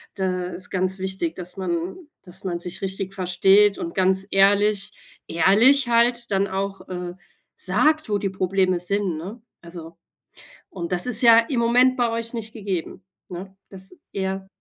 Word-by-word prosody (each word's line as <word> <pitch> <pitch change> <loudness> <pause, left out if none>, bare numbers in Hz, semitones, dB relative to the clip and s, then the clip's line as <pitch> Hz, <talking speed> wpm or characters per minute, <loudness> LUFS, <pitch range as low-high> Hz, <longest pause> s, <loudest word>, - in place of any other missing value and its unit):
Da 185 -2 -2
ist 180 0 -5
ganz 185 +1 0
wichtig, 190 -3 -3
dass 180 -1 -6
man 175 - -3 0.3
dass 185 +1 -3
man 175 -2 -3
sich 180 +2 -5
richtig 195 0 -4
versteht 195 +3 +3
und 170 - -5
ganz 190 +1 +2
ehrlich 200 +1 +3 0.4
ehrlich 230 - +4
halt 235 0 +2
dann 195 +1 +1
auch, 195 +1 -4
äh, 180 -1 -5 0.4
sagt, 310 -5 +1
wo 205 - +1
die 200 0 -2
Probleme 185 -1 0
sind, 190 -2 -1
ne? 200 +8 -8 0.2
Also 170 -1 -10 0.7
und 170 -2 -6
das 180 +3 +3
ist 245 0 +6
ja 230 -1 +7
im 235 +2 -1
Moment 250 +2 +3
bei 240 -1 +1
euch 230 +1 -2
nicht 225 -2 -6
gegeben, 195 -5 -5 0.2
ne? 190 +2 -9
Das 190 - -7 0.2
ja. 190 0 -4
190 Hz, 160 wpm, -22 LUFS, 180-215 Hz, 0.7 s, ja